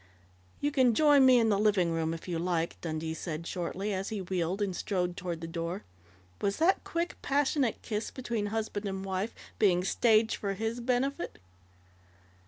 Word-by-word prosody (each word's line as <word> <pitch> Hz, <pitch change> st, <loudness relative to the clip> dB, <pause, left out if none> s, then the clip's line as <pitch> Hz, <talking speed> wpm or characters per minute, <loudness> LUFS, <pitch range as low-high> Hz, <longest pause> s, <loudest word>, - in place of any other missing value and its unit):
"You 290 Hz, -, +1 dB
can 255 Hz, -5 st, +4 dB
join 290 Hz, -2 st, +6 dB
me 255 Hz, -1 st, +7 dB
in 225 Hz, -2 st, +4 dB
the 200 Hz, -2 st, +2 dB
living 200 Hz, -5 st, +3 dB
room, 165 Hz, -1 st, 0 dB
if 165 Hz, +2 st, -6 dB
you 170 Hz, -2 st, -2 dB
like," 170 Hz, -1 st, -1 dB
Dundee 160 Hz, -1 st, -3 dB
said 160 Hz, 0 st, -5 dB
shortly, 185 Hz, +4 st, -3 dB
as 190 Hz, +1 st, -2 dB
he 215 Hz, -, -3 dB
wheeled 185 Hz, 0 st, -1 dB
and 200 Hz, -3 st, -1 dB
strode 180 Hz, -3 st, -1 dB
toward 175 Hz, -2 st, -4 dB
the 165 Hz, -, -5 dB
door. 170 Hz, +3 st, -4 dB, 0.6 s
Was 200 Hz, 0 st, 0 dB
that 350 Hz, +4 st, +3 dB
quick, 340 Hz, +1 st, -2 dB
passionate 280 Hz, -3 st, +1 dB
kiss 215 Hz, -1 st, -2 dB
between 235 Hz, -5 st, -3 dB
husband 215 Hz, -1 st, -3 dB
and 190 Hz, 0 st, -4 dB
wife 190 Hz, +3 st, -2 dB, 0.2 s
being 180 Hz, -4 st, +4 dB
staged 220 Hz, +3 st, +3 dB
for 200 Hz, -1 st, -2 dB
his 225 Hz, +4 st, -2 dB
benefit? 260 Hz, +6 st, -1 dB
200 Hz, 175 wpm, -30 LUFS, 175-235 Hz, 0.6 s, me